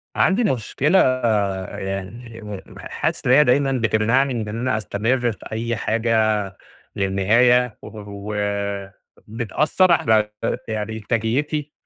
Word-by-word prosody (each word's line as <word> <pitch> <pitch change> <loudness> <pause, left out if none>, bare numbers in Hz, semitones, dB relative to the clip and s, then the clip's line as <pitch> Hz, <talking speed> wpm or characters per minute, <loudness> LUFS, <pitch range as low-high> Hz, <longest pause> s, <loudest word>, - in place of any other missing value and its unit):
عندي 195 +5 +3
ن 210 - +2
مشكلة 140 - +1 0.7
يعني 105 +5 -6 0.4
ح - - -8
حاسس - - -2
إن - - +4
هي 150 +3 +7
دايمًا 135 +1 +2
بتمنعني 120 +1 +1
بإن 105 +1 -5
أنا 125 -2 0
أستمر 110 +4 0
في 105 - -11
أي 115 +2 -2
حاجة 115 +1 -1 0.8
للنهاية 110 +5 +2
و - - -10 1.4
وبتأثّر 130 - +1
علي 110 -9 +3
ت - - -21 0.2
يعني 110 0 -3
إ - - -5
إنتاجيتي، 125 +8 -1
115 Hz, 120 wpm, -21 LUFS, 110-130 Hz, 1.4 s, هي